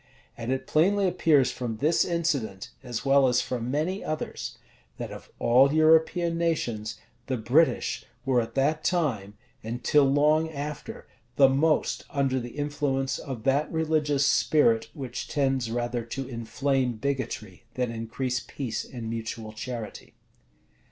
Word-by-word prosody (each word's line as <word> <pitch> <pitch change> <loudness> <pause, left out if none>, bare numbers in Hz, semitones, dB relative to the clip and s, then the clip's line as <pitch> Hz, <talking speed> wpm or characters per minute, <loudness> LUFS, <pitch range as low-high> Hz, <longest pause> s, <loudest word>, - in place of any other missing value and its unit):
And 115 +2 -4
it 130 - -2
plainly 195 +5 +3
appears 150 -8 +3
from 120 -4 -4
this 155 +7 +3
incident, 130 - -2
as 125 -2 -5
well 135 0 +5
as 125 0 +3
from 120 -1 -3
many 160 +8 -1
others, 155 0 -4 0.4
that, - - -5
of - - -10
all 130 +4 +5
European 160 +2 +3
nations, 120 -10 -1 0.3
the 130 -2 -1
British 130 +9 +2 0.2
were 130 -2 +3
at 115 - -7
that 150 +3 +1
time, 120 - 0 0.3
and 120 +2 -5
till 150 +1 +5
long 155 +3 +3
after, 150 -1 -6 0.3
the 135 0 +6
most 150 +4 +1
under 135 -2 0
the 120 +2 -8
influence 145 -2 -1
of 130 -5 -6
that 140 +4 +1
religious 155 -3 +1
spirit 115 -9 +3
which 130 -4 -5
tends 135 -4 0
rather 120 0 -2
to 130 +3 -5
inflame 125 +2 -1
bigotry 115 -4 -4
than 125 -2 -1
increase 120 +3 -2
peace 125 -3 -4
and 120 -3 -7
mutual 115 -1 -5
charity. 115 -1 -7
135 Hz, 140 wpm, -27 LUFS, 120-150 Hz, 0.4 s, the